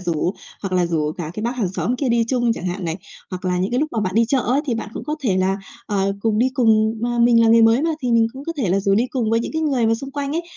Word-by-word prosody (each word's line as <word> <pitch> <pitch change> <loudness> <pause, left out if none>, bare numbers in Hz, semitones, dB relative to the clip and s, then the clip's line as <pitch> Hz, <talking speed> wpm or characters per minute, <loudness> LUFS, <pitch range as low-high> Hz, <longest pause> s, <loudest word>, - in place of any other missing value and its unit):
rủ 175 +1 -1 0.3
hoặc 195 - -4
là 180 -1 +2
rủ 155 -2 -1
cả 160 -3 -6
cái 215 - -5
bác 240 +3 -2
hàng 215 -7 0
xóm 240 +5 -1
kia 270 0 -1
đi 235 -1 +2
chung 240 -2 +1
chẳng 185 - -5
hạn 180 +1 -3
này. 165 -1 -2 0.3
Hoặc 185 -1 -6
là 180 -1 0
những 185 +2 -1
cái 245 +2 0
lúc 310 - 0
mà 225 - -1
bạn 190 -2 -2
đi 230 +1 +4
chợ 270 +4 +1
ấy 255 +4 +1
thì 245 - 0
bạn 225 - -4
cũng - - -6
có 305 0 -3
thể 215 -9 0
là, 190 +1 +1 0.3
ờ, 195 -1 0
cùng 215 0 +1
đi 250 +3 +3
cùng 220 -3 +3
mà 240 0 -1
mình 235 0 +5
là 225 - +4
người 230 0 +6
mới 225 +4 +4
mà 330 - +1
thì 245 -2 0
mình 230 -1 +4
cũng 270 +1 -9
có 330 - -3
thể 250 -9 -1
là 190 +3 +2
rủ 195 0 +2
đi 230 +5 +2
cùng 235 -5 -1
với 230 0 +2
những - - -5
cái 315 0 -1
người 265 -7 +1
mà 225 - +3
xung 270 +4 -7
quanh 285 0 -3
ấy, 335 +2 -1
225 Hz, 330 wpm, -21 LUFS, 195-250 Hz, 0.3 s, người